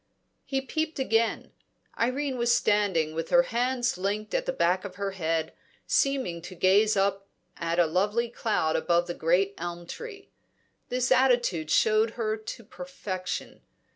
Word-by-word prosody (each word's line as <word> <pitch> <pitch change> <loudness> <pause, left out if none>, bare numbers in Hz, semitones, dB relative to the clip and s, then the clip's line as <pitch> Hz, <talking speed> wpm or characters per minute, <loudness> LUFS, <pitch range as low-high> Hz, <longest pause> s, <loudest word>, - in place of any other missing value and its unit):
He 270 -1 -1
peeped 315 +4 -3
again. 230 -4 0 0.4
Irene 260 +3 0
was 235 0 +2
standing 200 -9 +2
with 165 +1 -4
her 260 0 +6
hands 245 -3 0
linked 205 +3 -2
at - - 0
the - - +2
back 185 - +1
of 195 -3 -7
her 200 +1 -3
head, 165 -3 -2 0.3
seeming 260 -12 +1
to 185 +2 -9
gaze 200 +4 +4
at 195 0 +1 0.5
a 175 - +5
lovely 205 +8 +1
cloud 215 -9 0
above 175 0 +2
the 175 - -4
great 180 +5 +1
elm 175 0 -5
tree. 400 - -9 0.6
This 250 +1 0
attitude 240 -11 +3
showed 220 +4 +3
her 215 -2 0
to 220 +2 -8
perfection. 200 -8 -6
215 Hz, 145 wpm, -27 LUFS, 180-250 Hz, 0.6 s, her